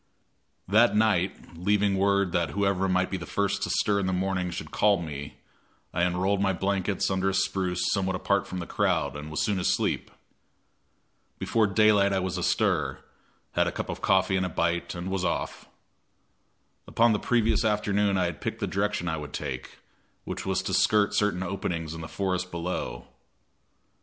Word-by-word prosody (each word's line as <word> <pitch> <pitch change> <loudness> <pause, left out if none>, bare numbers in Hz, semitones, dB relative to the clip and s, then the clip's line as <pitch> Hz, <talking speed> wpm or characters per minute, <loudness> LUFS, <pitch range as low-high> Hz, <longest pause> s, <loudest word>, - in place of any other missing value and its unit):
That 110 +5 +4
night, 100 -5 +1
leaving 100 +3 +1
word 100 -1 +2
that 85 -4 0
whoever 100 -1 +1
might 90 0 +1
be 95 - -1
the - - -8
first 100 0 -1
to - - -1
stir 100 -1 +2
in 95 - -1
the 95 - 0
morning 90 -1 -1
should 85 - -6
call 100 -2 +3
me, 75 -4 -7 0.6
I 85 - 0
unrolled 90 +3 +1
my 95 -1 +2
blankets 95 +1 0
under 95 0 +1
a 95 - -1
spruce 95 -2 0
somewhat 95 -2 0
apart 100 +2 0
from 95 - -5
the 90 - -4
crowd, - - 0
and 75 +1 -7
was 80 - -1
soon 100 -3 0
asleep. 90 - 0 1.3
Before 110 -2 +1
daylight 100 -1 +4
I 95 - +2
was 95 0 -2
astir, 85 -8 0 0.5
had - - +2
a - - 0
cup - - -5
of - - -5
coffee 95 0 +3
and 95 - 0
a - - -5
bite, 85 +2 -1
and 90 +2 -4
was 95 -1 -1
off. - - -3 1.2
Upon 115 0 +3
the 105 - 0
previous 115 -2 +2
afternoon 105 -2 +1
I 90 - +2
had 85 -3 -4
picked - - -3
the - - -1
direction 100 -2 -1
I 80 -1 -1
would 75 -1 -7
take, - - -5 0.5
which - - -5
was - - 0
to - - -3
skirt 105 -1 +3
certain 100 -3 +1
openings 85 -4 -3
in 80 - -7
the 80 - -6
forest 90 -1 -2
below. 85 -8 -4
95 Hz, 180 wpm, -27 LUFS, 90-100 Hz, 1.3 s, That